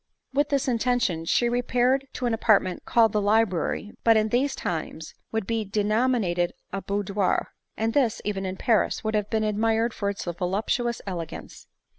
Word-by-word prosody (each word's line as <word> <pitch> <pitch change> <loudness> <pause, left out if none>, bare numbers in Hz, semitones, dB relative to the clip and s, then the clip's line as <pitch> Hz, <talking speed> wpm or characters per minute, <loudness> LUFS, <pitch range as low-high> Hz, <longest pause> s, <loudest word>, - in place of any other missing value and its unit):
With 290 +1 +2
this 275 -2 0
intention 235 -8 0
she 240 +8 +2
repaired 245 +2 +1
to 250 - -3
an 240 - +1
apartment 200 -5 +2
called 225 -2 +4
the 210 - +2
library, 205 -1 +1
but 225 -1 +5
what - - +5
in 215 0 +2
these 265 +4 +1
times 160 -1 -4 0.2
would 220 -3 -1
be 225 0 -1
denominat 210 -1 +1
ed 175 0 +1 0.2
a 195 - -2
boudoir; 200 -1 -1 0.3
and 225 +1 0
this, 255 -7 +2
even 200 -2 -2
in 190 0 -4
Paris, 225 +1 +1
would 220 0 -1
have 210 -1 0
been 220 -1 0
admired 225 +2 +1
for 200 - -2
its 200 - -4
voluptuous 195 +7 -1
elegance. 175 -5 -7
215 Hz, 175 wpm, -25 LUFS, 195-235 Hz, 0.3 s, but